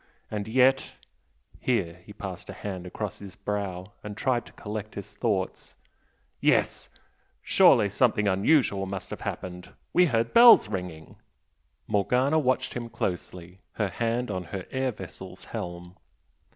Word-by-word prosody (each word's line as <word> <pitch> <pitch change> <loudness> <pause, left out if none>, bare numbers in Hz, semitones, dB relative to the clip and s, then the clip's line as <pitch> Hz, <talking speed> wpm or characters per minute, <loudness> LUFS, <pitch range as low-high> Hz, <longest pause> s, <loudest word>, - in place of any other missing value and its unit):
And 105 -1 -3
yet 130 +3 +3 0.3
" - - -44 0.3
here 90 -8 -1
he 105 - -13
passed 95 -3 -7
a - - -5
hand 95 -3 -6
across 105 +1 -5
his 95 -3 -10
brow 100 -1 -4
and 105 0 -7
tried 125 -1 0
to - - -15
collect 105 0 -6
his 100 - -8
thoughts - - -2 0.6
"yes! - - +1 0.5
surely 105 -3 +6
something 105 0 +2
unusual 100 0 +3
must 95 -1 -6
have - - -6
happened! 90 -1 -6 0.2
We 180 0 +5
heard 115 -4 0
bells 235 - +9
ringing 90 -6 -6 0.4
" - - -46 0.3
Morgana 125 +9 +2
watched 130 -3 0
him 120 -1 -5
closely, 90 -4 -4
her 105 -3 -1
hand 115 +3 -1
on 95 -2 -3
her 95 +2 -6
air 130 0 0
vessel's 105 - -10
helm. 85 +1 -6
105 Hz, 145 wpm, -27 LUFS, 95-120 Hz, 0.6 s, bells